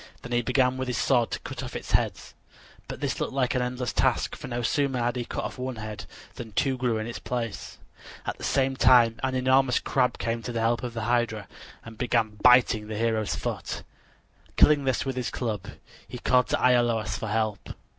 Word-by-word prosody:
Then 125 - -8
he 120 0 +2
began 130 +1 +2
with 130 0 -3
his 125 -3 -2
sword 120 -2 +2
to - - -3
cut - - -6
off - - -7
its - - -6
heads. - - 0 0.5
But - - -7
this - - -2
looked - - -2
like 130 -2 +1
an 125 - +1
endless 125 0 -2
task, - - +1
for - - -8
no 120 0 -3
sooner 140 +2 +1
had 120 0 0
he 120 -1 -3
cut - - -4
off - - -6
one 130 0 -3
head 110 -1 -7 0.3
than 115 -3 -8
two 135 +4 +1
grew 125 -3 0
in 110 - -3
its 120 - -6
place. 115 -4 -4 0.5
At - - -4
the - - -9
same 135 -1 +1
time 120 -3 +5
an 130 -1 -1
enormous 130 0 +3
crab 125 -2 0
came 115 0 -2
to 120 - -5
the 115 - -2
help 115 +1 +1
of 120 -2 -5
the 115 - -3
hydra 115 -3 0 0.4
and 115 -1 -11
began 115 -4 0
biting 125 -4 +5
the 110 -1 -5
hero's 110 -2 0
foot. - - -4 0.7
Killing 145 -2 +5
this 130 0 0
with 135 -1 -2
his 125 -2 -2
club, 105 -5 -3 0.4
he 125 - -7
called 125 +1 +2
to - - +1
Iolaus 120 -3 +2
for 110 - -4
help. 110 -1 -2
120 Hz, 215 wpm, -26 LUFS, 115-130 Hz, 0.7 s, time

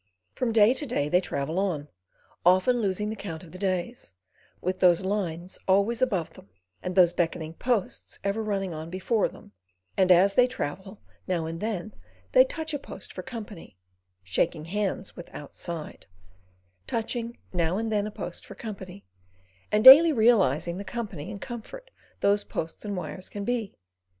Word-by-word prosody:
From 245 -2 -1
day 220 +1 +6
to 285 +2 -3
day 150 - 0
they 180 +3 +4
travel 155 +1 -2
on, 170 -7 -1 0.6
often 185 +8 +4
losing 210 +1 -1
the - - -4
count 175 -6 -7
of 165 - -13
the 185 - -9
days, 185 - -2 0.5
with 185 +1 -2
those 180 0 +4
lines 185 -3 -3
always 200 +5 +3
above 180 -10 0
them, 100 - -16 0.3
and 180 0 -4
those 175 -2 +6
beckoning 165 -2 -1
posts 235 +1 -2
ever 200 +3 0
running 195 -4 -2
on 160 +1 -6
before 190 +4 +1
them - - -14 0.4
and 185 -1 +4
as 185 +3 +6
they 250 +4 +5
travel, 190 - -6 0.2
now 175 -4 0
and 165 +1 -5
then 215 -1 -3 0.4
they - - +8
touch 320 -11 -5
a 290 - -1
post - - -9
for - - -5
company—shaking 95 - -5
hands 195 +1 -2
with 175 - -10
Outside: 155 +2 -7 0.8
touching 235 +1 -3 0.2
now 175 +1 +1
and 225 0 -2
then 210 -1 +1
a - - -6
post 180 -4 -7
for 200 - -11
company, 195 -3 -8 0.7
and 210 +1 +2
daily 295 +6 +11
realising 190 - +3
the 200 - -5
company 200 -8 -5
and 200 - -7
comfort 265 - -8 0.3
those 205 +1 +3
posts 160 0 -5
and 205 -2 -3
wires 185 +1 -6
can 205 -1 -5
be. 235 -4 -2
195 Hz, 165 wpm, -27 LUFS, 170-220 Hz, 0.8 s, daily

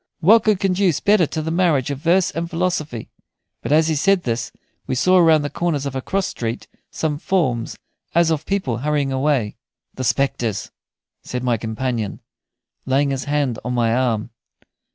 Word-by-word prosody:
What 210 +7 +5
could 215 -3 +3
conduce 185 -4 +1
better 205 -5 +3
to 155 +1 -4
the 160 - -3
marriage 165 -6 +2
of 140 - -4
verse 175 +4 +2
and 165 +2 -4
philosophy?" 165 -8 -2 0.5
But - - -4
as 155 +1 +4
he 160 - +1
said 185 +5 +2
this 115 -1 -2 0.4
we 130 - -1
saw 185 +8 +4
around 160 -3 +5
the 145 - -2
corner 170 -3 0
of 140 -1 -4
a 130 - -2
cross 195 +7 -1
street 115 0 -4 0.2
some 150 -2 -2
forms 130 -13 -1 0.4
as 170 -1 +4
of 155 -1 -2
people 190 -12 -1
hurrying 145 0 0
away. 130 -6 0 0.4
"The 130 - -5
spectres," 120 -3 -1 0.5
said 125 0 -5
my 120 -2 +1
companion, 110 -1 -3 0.7
laying 140 +2 +2
his 135 -1 -3
hand 145 -5 0
on 125 +1 -2
my 115 -2 +2
arm. 120 -4 0
145 Hz, 175 wpm, -21 LUFS, 125-170 Hz, 0.7 s, What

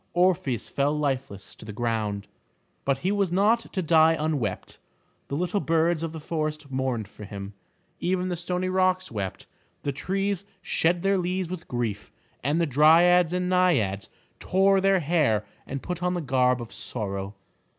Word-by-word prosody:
Orpheus 175 - +1
fell 145 +2 0
lifeless 135 -8 -3
to - - -14
the 110 - -7
ground. 105 -2 -2 0.6
But 135 -1 +2
he 190 - +3
was 200 -3 +1
not 210 +6 +2
to 185 - -2
die 160 0 +5
unwept. 145 -11 -2 0.5
The 140 - -3
little 180 +5 0
birds 165 -1 +1
of 165 -1 -3
the 160 - -7
forest 155 -2 -3
mourned 130 -5 -1
for 105 - -12
him, 100 0 -7 0.5
even 185 +1 0
the 180 - -1
stony 180 +2 -2
rocks 185 0 +1
wept, 100 -4 -4 0.4
the 140 - 0
trees 195 +6 -2 0.2
shed 170 +1 +1
their 195 0 +3
leaves 180 0 -2
with 180 -2 -6
grief, 115 -5 -3 0.3
and 145 +5 +1
the 170 - +3
dryads 165 +4 +5
and 180 0 -1
naiads 150 - +2 0.3
tore 195 +1 +3
their 195 -1 +3
hair 145 -10 +2 0.2
and 135 0 -5
put 180 -1 -4
on 180 0 0
the 175 - -2
garb 125 -3 +2
of 115 - -11
sorrow. 100 -3 -4
160 Hz, 165 wpm, -26 LUFS, 125-180 Hz, 0.6 s, die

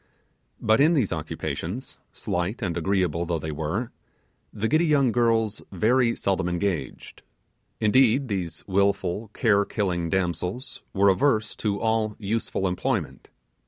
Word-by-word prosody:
But 110 +3 +3
in 160 +4 +5
these 115 - +1
occupations, 80 - -5
slight 90 +7 -3
and 85 -4 -1
agreeable 90 -2 0
though 85 -1 0
they 80 0 -4
were, 80 +10 -3 0.6
the 110 +2 -2
giddy 160 +6 +3
young 140 -5 +3
girls 115 -2 +1
very 115 +5 +2
seldom 95 -3 0
engaged. 90 -6 -3 0.6
Indeed 130 +4 +4
these 95 -6 -4
wilful 100 +1 0
care 100 -4 +3
killing 90 -5 -2
damsels 90 - -2
were 100 0 +4
averse 110 +1 +2
to 100 -2 -1
all 110 -2 0
useful 105 -2 -2
employment. 90 0 -2
100 Hz, 125 wpm, -25 LUFS, 90-115 Hz, 0.6 s, in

